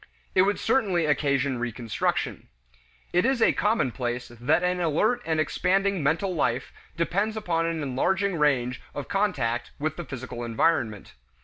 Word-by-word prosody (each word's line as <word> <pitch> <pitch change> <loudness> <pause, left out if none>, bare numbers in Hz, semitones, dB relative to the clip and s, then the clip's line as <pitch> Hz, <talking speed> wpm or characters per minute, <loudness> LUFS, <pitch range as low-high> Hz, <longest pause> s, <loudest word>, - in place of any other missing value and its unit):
It 185 - +5
would 200 +2 +2
certainly 190 -10 +1
occasion 140 -3 +1
reconstruction. 120 -2 -2 0.7
It 180 +1 +4
is 265 -1 +2
a - - +4
commonplace 125 - -1
that 125 +9 +1
an 180 0 +1
alert 195 +9 +1
and 160 -1 +1
expanding 195 +4 +1
mental 165 +6 +1
life 125 -6 -1 0.2
depends 200 +6 0
upon 165 -6 0
an 165 -2 -2
enlarging 190 +9 0
range 125 -4 +1
of 145 - -4
contact 125 - 0
with 155 +2 -2
the 175 - -4
physical 130 -3 -6
environment. 115 - 0
155 Hz, 140 wpm, -26 LUFS, 125-190 Hz, 0.7 s, It